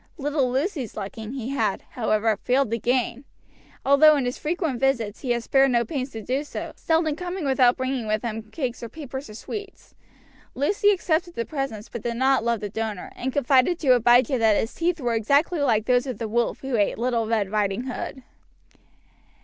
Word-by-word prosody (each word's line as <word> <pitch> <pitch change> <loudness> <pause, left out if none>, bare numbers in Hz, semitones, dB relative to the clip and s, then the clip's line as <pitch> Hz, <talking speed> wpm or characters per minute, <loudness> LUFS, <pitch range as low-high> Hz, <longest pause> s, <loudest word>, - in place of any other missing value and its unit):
Little 285 -3 0
Lucy's 270 - -2
liking 220 +4 -6
he 255 -3 -4
had, 275 - -1
however, 220 -2 +1
failed 250 +3 +1
to 230 - 0
gain, 245 +1 0 0.6
although 300 +3 +7
in 275 -3 0
his 245 - -2
frequent 320 -5 -2
visits 235 -6 0
he 260 - -6
had 240 -1 +1
spared 270 +2 +4
no 235 -2 +2
pains 265 +1 -3
to 225 -4 -8
do 265 +6 -1
so, 295 - -6
seldom 320 -2 +1
coming 360 0 -4
without 260 -2 +4
bringing 260 -3 -2
with 215 0 0
him 220 -2 -5
cakes 250 -1 -4
or 235 - -6
papers 275 -4 -7
of 215 - -9
sweets. 405 - -8 0.6
Lucy 400 +9 +2
accepted 345 -3 0
the 230 - -2
presents, 270 -8 -4
but 235 - -7
did 235 +1 -3
not 265 0 +3
love 235 -2 0
the 210 - -3
donor, 215 -2 -4
and 260 +2 -3
confided 275 +4 +3
to 275 -7 +4
Abijah 245 +2 +4
that 220 -2 +4
his 225 - -3
teeth 340 0 -1
were 240 -4 -1
exactly 280 - +2
like 225 -7 +2
those 250 +2 +2
of 255 -5 -4
the 225 - -3
wolf 235 +2 -1
who 265 -2 -2
ate 205 -3 +1
Little 235 -1 0
Red 215 -4 0
Riding 210 +1 0
Hood. 260 0 -6
255 Hz, 195 wpm, -24 LUFS, 225-280 Hz, 0.6 s, although